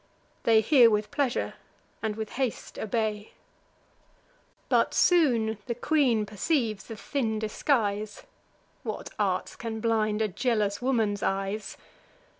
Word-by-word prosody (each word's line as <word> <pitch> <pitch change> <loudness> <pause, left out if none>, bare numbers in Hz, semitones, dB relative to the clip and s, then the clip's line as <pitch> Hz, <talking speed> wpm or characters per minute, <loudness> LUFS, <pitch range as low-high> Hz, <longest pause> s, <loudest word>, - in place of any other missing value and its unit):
They 225 -1 +6
hear 240 0 +6
with 210 -1 0
pleasure, 275 -4 -1 0.5
and 220 -1 -2
with 220 -1 -5
haste 260 -3 -3
obey. 215 -1 -2 1.3
But - - +2
soon 235 - +3
the 235 - -2
queen 250 -5 +2
perceives 215 - -1
the 225 - -7
thin 225 -1 -2
disguise: 215 -2 -1 0.6
(What - - -5
arts - - 0
can 225 -2 -5
blind 220 -1 +1
a - - +1
jealous 210 -1 0
woman's 225 -6 +1
eyes!) 195 +2 -2
220 Hz, 115 wpm, -27 LUFS, 210-245 Hz, 1.3 s, They